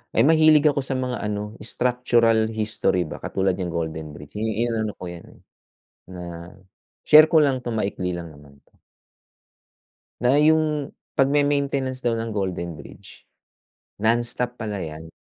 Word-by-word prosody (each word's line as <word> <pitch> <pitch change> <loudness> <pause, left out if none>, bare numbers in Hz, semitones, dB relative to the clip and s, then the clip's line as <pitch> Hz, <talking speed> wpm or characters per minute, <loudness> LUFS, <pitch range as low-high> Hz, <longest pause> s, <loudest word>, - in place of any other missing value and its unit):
Eh, - - +4
mahilig 155 -2 +5
ako 145 -1 +2
sa 130 - -5
mga 125 -1 -3
ano, 105 +1 -4
structural 115 -2 +2
history 110 -5 0
ba - - -7
katulad 95 -1 0
niyang 90 -2 -4
Golden 80 -2 -4
Bridge. 75 +3 -13
I 110 +2 -1
inaano 110 -2 -2
ko 90 - -6
'yan, 85 -1 -9 0.8
na 85 0 -9 0.5
share 155 +1 +8
ko 155 -1 +4
lang 135 -3 +1
'to, 120 -2 -5
maikli 95 -4 -2
lang 85 -2 -7
naman 70 -1 -17
'to. - - -34 1.4
Na 125 +3 +3
yung 155 -1 +2 0.2
pagme-maintenance 140 -2 +1
daw 120 - +2
ng 115 0 -3
Golden 90 -5 -3
Bridge, 70 - -14 0.7
nonstop 120 +2 0
pala 105 -4 -5
'yan. 80 -1 -7
110 Hz, 140 wpm, -23 LUFS, 90-130 Hz, 1.4 s, share